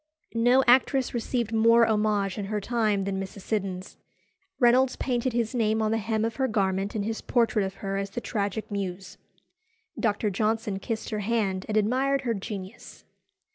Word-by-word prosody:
No 245 +3 +4
actress 260 +1 +3
received 235 -1 -2
more 230 +1 +5
homage 210 -3 0
in 200 - -3
her 210 +1 -2
time 215 -2 0
than 195 0 -2
Mrs. 195 +1 -8
Siddons. 190 -3 -3 0.6
Reynolds 250 +1 +4
painted 250 0 -1
his 235 0 -1
name 220 -2 +1
on 215 0 +1
the 225 - +1
hem 220 0 -1
of 225 0 -4
her 265 -1 +1
garment 195 -2 -1
in 210 - -1
his 220 +1 -3
portrait 230 -3 +1
of 190 0 -4
her 195 0 -1
as 195 0 -3
the 195 - -4
Tragic 205 -1 -3
Muse. 195 -2 -5 0.8
Dr. 210 -2 0
Johnson 215 0 -1
kissed 220 +3 -4
her 215 - -2
hand 200 -3 -1
and 215 - 0
admired 260 +6 +2
her 240 -3 -1
genius. 200 0 -8
215 Hz, 175 wpm, -26 LUFS, 200-235 Hz, 0.8 s, more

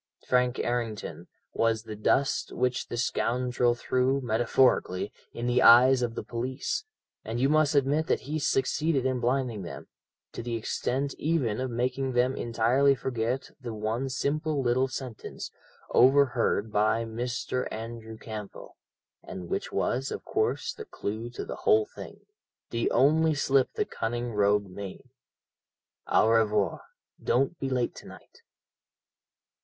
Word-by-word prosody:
Frank 125 -1 +2
Errington 120 -3 -3 0.3
was 115 -1 +1
the 110 -2 -7
dust 135 +6 +1
which 125 0 -1
the 120 - -5
scoundrel 120 0 +1
threw 130 +2 +1
metaphorically 120 -5 +1 0.2
in 120 - -5
the 125 +1 +2
eyes 125 +2 +7
of 120 -2 -2
the - - -4
police, 130 - -3 0.4
and 115 +2 -4
you 135 - +3
must 155 0 +3
admit 145 +3 +2
that - - +1
he 155 +3 -3
succeeded 135 +1 +1
in 130 -1 0
blinding 120 -3 0
them 85 - -8 0.4
to - - -6
the 120 0 -3
extent 130 +4 -2
even 145 -9 0
of 130 0 -2
making 130 +2 -1
them 125 +2 +2
entirely 120 +4 +2
forget 125 0 -2
the 120 -3 -5
one 110 +5 -2
simple 145 +3 -1
little 125 +2 +2
sentence, 130 -4 -7 0.4
overheard 125 -5 +3
by 110 +2 +2
Mr. 120 +2 -3
Andrew 110 0 -7
Campbell, 110 -3 -9 0.4
and 90 -2 -8
which - - -3
was, 130 +3 -1
of - - -6
course, 435 +1 -1
the 440 - -9
clue 110 - -5
to 120 - -6
the - - -6
whole 435 -1 +3
thing - - -11 0.5
the 115 0 0
only 155 +5 +3
slip 135 -1 +2
the - - 0
cunning 120 +1 -3
rogue 105 0 +3
made 100 +6 -9 1.0
'Au - - +4
revoir! 105 -3 +2 0.4
Don't 135 +8 +1
be 135 - -2
late 125 -2 0
to - - -11
night.' - - -15
125 Hz, 140 wpm, -28 LUFS, 115-135 Hz, 1.0 s, eyes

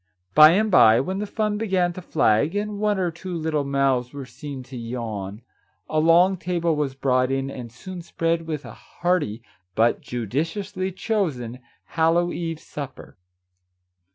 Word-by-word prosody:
By 155 +1 +9
and 215 +3 +2
by, 115 -9 +7
when 185 +9 -2
the 210 - -3
fun 210 0 -1
began 185 -5 +1
to 185 - -8
flag, 145 - +2
and 205 0 -2
one 210 -1 +1
or 180 -2 0
two 175 +2 -7
little 155 -2 -1
mouths 135 -2 +1
were 140 -2 -6
seen 140 0 -8
to 130 +1 -11
yawn, 115 -3 -5 0.4
a 155 - 0
long 175 +4 +5
table 170 -2 0
was 145 -3 -2
brought 130 -1 +1
in 135 0 -1
and 120 -4 -8
soon 180 +9 -8
spread 165 0 -1
with 155 -2 -4
a - - -9
hearty 165 -11 -2 0.3
(but 115 +2 +2
judiciously 165 - -3
chosen) 155 - -2 0.3
Hallow 170 +2 +2
eve 165 -2 -4
supper. 140 -4 -9
160 Hz, 155 wpm, -24 LUFS, 130-180 Hz, 0.4 s, By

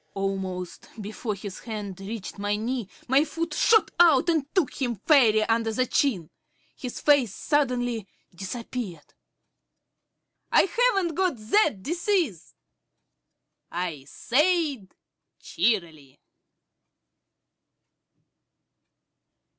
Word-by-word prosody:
Almost 190 -2 -4
before 215 +1 -4
his 195 -1 -8
hand 205 -4 -6
reached 200 0 -7
my 205 0 0
knee, 230 -1 -3 0.2
my 270 +4 +4
foot 330 +1 -4
shot 445 +8 +4
out 335 -1 +5
and 315 -4 +1
took 345 -6 0
him 240 -3 0
fairly 220 - +4
under 225 0 +1
the 255 +3 +1
chin. 220 - 0 0.4
His 250 -2 -6
face 270 -8 +3
suddenly 245 -7 0 0.3
disappeared. 195 -2 -6 1.4
"I - - +6
haven't 395 -6 +1
got 365 -2 +1
that 220 - +1
disease," 340 - -1 1.2
I 170 -6 -4
said 290 - 0 0.5
cheerily. 160 - -2
235 Hz, 90 wpm, -26 LUFS, 195-300 Hz, 1.4 s, I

